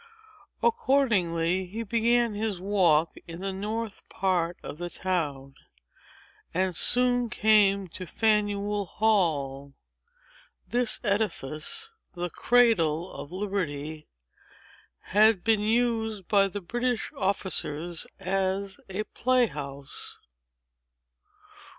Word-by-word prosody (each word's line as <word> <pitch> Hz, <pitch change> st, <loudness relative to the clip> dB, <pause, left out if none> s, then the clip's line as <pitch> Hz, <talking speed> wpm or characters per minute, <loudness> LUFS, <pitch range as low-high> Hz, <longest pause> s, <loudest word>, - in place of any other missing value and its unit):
Accordingly, 190 Hz, -, +2 dB
he 220 Hz, +5 st, -5 dB
began 235 Hz, +1 st, +2 dB
his 210 Hz, -3 st, -2 dB
walk 175 Hz, -5 st, +2 dB
in 165 Hz, 0 st, -8 dB
the 195 Hz, 0 st, -3 dB
north 215 Hz, +2 st, -4 dB
part 180 Hz, -3 st, 0 dB
of 150 Hz, -, -7 dB
the 175 Hz, 0 st, -4 dB
town, 145 Hz, -8 st, -2 dB, 1.0 s
and 185 Hz, -1 st, +1 dB
soon 245 Hz, +2 st, +3 dB
came 205 Hz, -3 st, +4 dB
to 185 Hz, +2 st, -8 dB
Faneuil 205 Hz, -1 st, +1 dB
Hall. 145 Hz, -11 st, 0 dB, 0.9 s
This 240 Hz, -2 st, +2 dB
edifice, 205 Hz, -, -1 dB, 0.2 s
the 175 Hz, -1 st, -4 dB
cradle 185 Hz, -9 st, +3 dB
of 145 Hz, -, -8 dB
liberty, 160 Hz, -6 st, -4 dB, 1.1 s
had 215 Hz, -2 st, +5 dB
been 225 Hz, -2 st, +3 dB
used 220 Hz, -3 st, 0 dB
by 200 Hz, -1 st, +4 dB
the 200 Hz, +1 st, -6 dB
British 240 Hz, +5 st, -2 dB
officers 175 Hz, -4 st, -2 dB
as 195 Hz, +1 st, -1 dB
a 195 Hz, +3 st, -2 dB
play 255 Hz, +3 st, +2 dB
house. 140 Hz, -7 st, -6 dB
195 Hz, 95 wpm, -27 LUFS, 170-220 Hz, 1.1 s, had